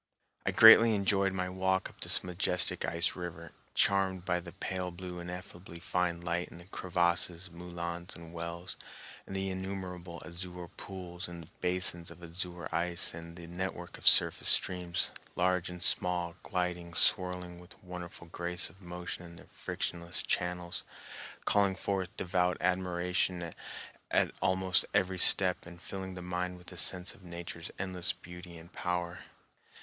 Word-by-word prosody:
I - - +4
greatly 115 0 +9
enjoyed 100 -1 +2
my 90 -1 -1
walk 95 +1 0
up - - -18
this - - +2
majestic 90 0 +2
ice 85 0 0
river, 85 -2 -6 0.2
charmed 95 -2 +2
by 90 -1 +1
the 85 0 -9
pale 95 0 -3
blue, 90 0 -7
ineffably 90 0 -8
fine 85 0 0
light 85 +1 -1
in - - -12
the 85 - -12
crevasses, 90 -1 0
moulins, 85 0 -6
and 85 -1 -11
wells, 85 +1 -5 0.5
and 95 - -6
the 95 0 -1
innumerable 95 -2 -5
azure 90 +1 -6
pools 90 -1 -7
in 85 -2 -9
basins 90 -1 0
of 85 - -13
azure 85 -1 -5
ice, 85 +1 +2
and 85 +1 -9
the 85 -1 -9
network 90 0 -5
of - - -5
surface - - +8
streams, 90 -2 +3 0.2
large 90 0 +1
and 90 0 -5
small, 90 -2 +1
gliding, 90 -1 -2
swirling 90 -1 +2
with 90 0 -15
wonderful 90 -1 -8
grace 85 0 -1
of 95 +3 -22
motion 90 0 -6
in 85 -1 -11
their - - -14
frictionless 85 0 -3
channels, 90 -1 -1 0.6
calling 100 -2 +4
forth 95 -1 -1
devout 90 0 +1
admiration 90 -1 0 0.6
at - - +3
almost 95 0 +3
every 95 0 +2
step 90 -1 +6
and 85 0 -11
filling 95 0 -6
the 90 - -7
mind 90 0 -2
with 90 +1 -12
a 90 - -10
sense 90 +1 -2
of - - -19
Nature's 85 -2 -7
endless 90 -2 +1
beauty 90 0 -11
and 85 +1 -13
power. 90 0 -2
90 Hz, 150 wpm, -32 LUFS, 85-95 Hz, 0.6 s, greatly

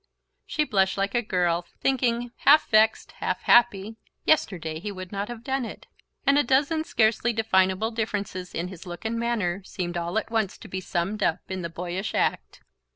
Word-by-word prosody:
She 305 - +1
blushed 190 -9 +1
like 195 0 0
a 240 - +2
girl, 175 -4 0
thinking, 245 -2 0
half 305 +2 +5
vexed, 220 0 +4
half - - -1
happy: 225 -2 +4 0.3
"Yesterday 165 - +1
he 205 +5 -5
would 185 -2 -8
not 200 0 -3
have 240 -1 -8
done 265 +1 -1
it..." 230 - -8 0.4
and 280 0 +5
a - - +4
dozen 285 +5 +2
scarcely 230 -3 +2
definable 215 -1 +2
differences 205 -5 -3
in 175 +2 -2
his 185 -1 -10
look 175 +4 -8
and 230 +1 -1
manner 205 -6 -1
seemed 175 -2 -4
all 170 +3 -2
at 220 - -2
once 220 -4 0
to - - -12
be 190 -1 -4
summed 190 +4 -2
up 170 -5 +1
in 190 -1 -3
the 170 - -4
boyish 180 +4 -4
act. - - -1
205 Hz, 185 wpm, -26 LUFS, 185-235 Hz, 0.4 s, half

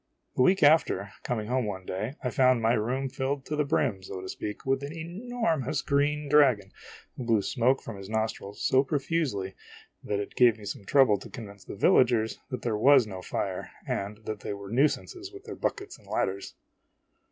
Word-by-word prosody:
The - - +2
week 185 +7 +4
after, 145 -9 +4
coming 110 -3 -2
home 125 -1 0
one 95 -2 -5
day, 105 +10 -4
I 125 - -1
found 130 0 +4
my 115 +1 +3
room 125 +5 0
filled 135 +1 -3
to 150 - -3
the 150 - +2
brim, 135 -8 0
so 95 0 -7
to 95 - -7
speak, 105 +2 -6
with 135 0 +1
an 140 +1 -5
enormous 170 - -2
green 145 +1 +1
dragon, 140 -7 +4 0.4
who 130 - -5
blew 115 -4 +2
smoke 130 +3 +1
from 115 - -7
his 95 0 -9
nostrils 110 -2 -3
so 130 +1 +4
profusely 135 - -1 0.5
that 100 - -1
it 100 - -5
gave 120 -3 +5
me 105 - -11
some 105 0 -6
trouble 125 -5 +4
to - - -11
convince 100 -4 -10
the - - -7
villagers 115 +1 +3
that 125 -4 -5
there 115 -3 0
was 135 +2 +6
no 95 -3 -7
fire - - -3 0.2
and 105 +2 -4
that 110 -1 -4
they 105 - -4
were 100 0 -9
nuisances, 155 - 0
with 395 0 -12
their - - -7
buckets 395 -2 -3
and - - -21
ladders 95 +1 -2
125 Hz, 195 wpm, -28 LUFS, 105-145 Hz, 0.5 s, was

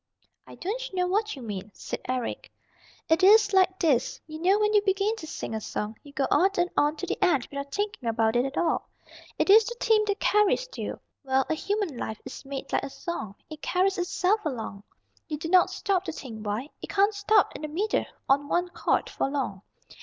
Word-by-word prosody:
"I - - -11
don't 455 +3 -4
know 360 -1 +2
what 420 +3 0
you 265 - -9
mean," 205 -2 -5
said - - -6
Eric. 255 -2 -3 0.6
"It 320 +3 +3
is 410 +1 +6
like 375 -1 +4
this: 295 -10 +1
you 310 0 -8
know 380 +4 +4
when 425 0 +2
you 415 - +6
begin 400 +2 +1
to 320 - -8
sing 225 - -5
a 220 - -3
song, 210 +1 -4
you 290 - -14
go 280 -1 0
on 380 - +5
and 355 0 +1
on 295 +1 +3
to - - -4
the - - -2
end 300 -9 +3
without 280 0 -5
thinking 410 - -2
about 225 0 +1
it 240 - +4
at 270 +1 -4
all. 340 - 0 0.5
It - - +3
is 440 +2 +9
the 475 +2 -5
theme 440 -1 +4
that 405 -1 0
carries 420 +4 +3
you. - - -4 0.2
Well, 265 -1 +2
a - - +4
human 390 - -2
life 220 -2 -4
is 260 - -8
made 275 -1 -6
like - - +3
a 275 - -5
song, 265 - -5
it 310 -1 -10
carries 380 +2 +1
itself 365 +4 +1
along. 230 - -4 0.5
You 305 - -3
do 320 +2 -5
not 370 +1 +5
stop 380 0 -1
to 330 - -3
think 230 -8 -8
why. 220 +8 -2
It - - -7
can't 405 +1 +3
stop 405 0 +3
in - - -7
the 305 - -3
middle, 380 +8 0 0.2
on 280 +1 +3
one 355 +3 0
chord, - - 0
for - - -2
long. 265 -9 -3
345 Hz, 220 wpm, -27 LUFS, 270-400 Hz, 0.6 s, is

